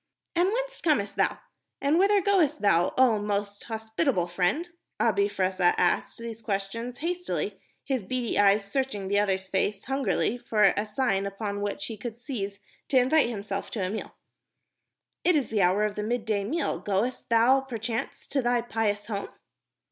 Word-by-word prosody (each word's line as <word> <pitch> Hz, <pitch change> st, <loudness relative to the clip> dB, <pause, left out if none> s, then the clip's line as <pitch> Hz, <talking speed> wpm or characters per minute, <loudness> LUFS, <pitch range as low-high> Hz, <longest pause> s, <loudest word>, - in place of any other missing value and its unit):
"And 350 Hz, +2 st, +3 dB
whence -, -, -3 dB
comest 280 Hz, -12 st, +1 dB
thou? -, -, +1 dB, 0.4 s
And 295 Hz, +4 st, +2 dB
whither 400 Hz, 0 st, +4 dB
goest 340 Hz, -7 st, +3 dB
thou, 175 Hz, -3 st, +4 dB
oh 245 Hz, -5 st, +5 dB
most 205 Hz, 0 st, -2 dB
hospitable 220 Hz, -, 0 dB
friend?" 180 Hz, -, 0 dB, 0.3 s
Abi 200 Hz, -3 st, +3 dB
Fressah 185 Hz, -2 st, +2 dB
asked 175 Hz, -, +1 dB
these 230 Hz, -1 st, -7 dB
questions 225 Hz, +4 st, -3 dB
hastily, 355 Hz, +3 st, -3 dB, 0.2 s
his 260 Hz, -6 st, -1 dB
beady 245 Hz, +2 st, -1 dB
eyes 200 Hz, 0 st, +4 dB
searching 205 Hz, -4 st, -2 dB
the 200 Hz, +1 st, +3 dB
other's 190 Hz, -2 st, 0 dB
face 195 Hz, +1 st, -1 dB
hungrily 265 Hz, -2 st, 0 dB
for 215 Hz, -3 st, +1 dB
a 205 Hz, +2 st, -1 dB
sign 210 Hz, -3 st, 0 dB
upon 200 Hz, 0 st, -4 dB
which 205 Hz, +8 st, -3 dB
he 225 Hz, -, -6 dB
could 230 Hz, +2 st, -6 dB
seize 205 Hz, -6 st, -5 dB, 0.3 s
to 270 Hz, -, +3 dB
invite 260 Hz, +2 st, +4 dB
himself 200 Hz, -3 st, -4 dB
to 200 Hz, -5 st, -2 dB
a 185 Hz, -, -2 dB
meal. 220 Hz, -, -6 dB, 1.1 s
"It 360 Hz, -, +4 dB
is 280 Hz, -6 st, +1 dB
the 210 Hz, -3 st, +2 dB
hour 185 Hz, +3 st, +3 dB
of 210 Hz, -, -2 dB
the 210 Hz, -, -4 dB
mid 225 Hz, +1 st, -2 dB
day 205 Hz, -3 st, 0 dB
meal. 320 Hz, +9 st, -1 dB
Goest 210 Hz, +6 st, -1 dB
thou, 235 Hz, +4 st, +5 dB
perchance, 235 Hz, -3 st, -4 dB
to 275 Hz, -, +1 dB
thy 240 Hz, -1 st, +2 dB
pious 215 Hz, -3 st, -1 dB
home?" 205 Hz, -2 st, -4 dB
220 Hz, 170 wpm, -27 LUFS, 200-260 Hz, 1.1 s, oh